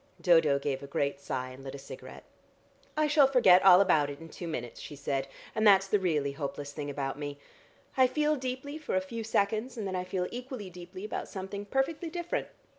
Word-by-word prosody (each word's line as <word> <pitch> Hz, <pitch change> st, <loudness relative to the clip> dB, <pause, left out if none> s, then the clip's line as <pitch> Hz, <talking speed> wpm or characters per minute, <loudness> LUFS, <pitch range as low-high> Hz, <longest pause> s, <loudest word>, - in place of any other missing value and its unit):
Dodo 165 Hz, -5 st, +5 dB
gave 140 Hz, -1 st, -2 dB
a 140 Hz, -, -8 dB
great 140 Hz, 0 st, -1 dB
sigh, 130 Hz, -2 st, -3 dB
and 130 Hz, +1 st, -11 dB
lit 135 Hz, 0 st, -7 dB
a -, -, -6 dB
cigarette. 135 Hz, -, -10 dB, 0.7 s
"I 310 Hz, -, +4 dB
shall 295 Hz, -2 st, +5 dB
forget 195 Hz, -9 st, +6 dB
all 185 Hz, -2 st, +9 dB
about 155 Hz, -7 st, +3 dB
it 140 Hz, -, -7 dB
in 165 Hz, 0 st, -11 dB
two 175 Hz, -, -7 dB
minutes," 120 Hz, -7 st, -5 dB
she 145 Hz, -, -8 dB
said, 135 Hz, -1 st, -2 dB, 0.3 s
"and 220 Hz, -1 st, +3 dB
that's 195 Hz, -1 st, +7 dB
the 205 Hz, +1 st, +2 dB
really 150 Hz, -7 st, 0 dB
hopeless 145 Hz, 0 st, -5 dB
thing 145 Hz, 0 st, -5 dB
about 140 Hz, 0 st, -3 dB
me. 145 Hz, -1 st, -5 dB, 0.6 s
I 260 Hz, -1 st, +6 dB
feel 300 Hz, +3 st, +1 dB
deeply 265 Hz, +3 st, -4 dB
for 305 Hz, -, -3 dB
a -, -, +4 dB
few 225 Hz, +5 st, -5 dB
seconds, 220 Hz, +3 st, 0 dB
and 215 Hz, -, -3 dB
then 190 Hz, -1 st, -3 dB
I 180 Hz, -, -1 dB
feel 185 Hz, 0 st, -2 dB
equally 245 Hz, -5 st, -6 dB
deeply 180 Hz, +3 st, -9 dB
about 215 Hz, -, -4 dB
something 200 Hz, +1 st, -6 dB
perfectly 275 Hz, -, -1 dB
different. 350 Hz, +9 st, -3 dB
185 Hz, 210 wpm, -30 LUFS, -, 0.7 s, all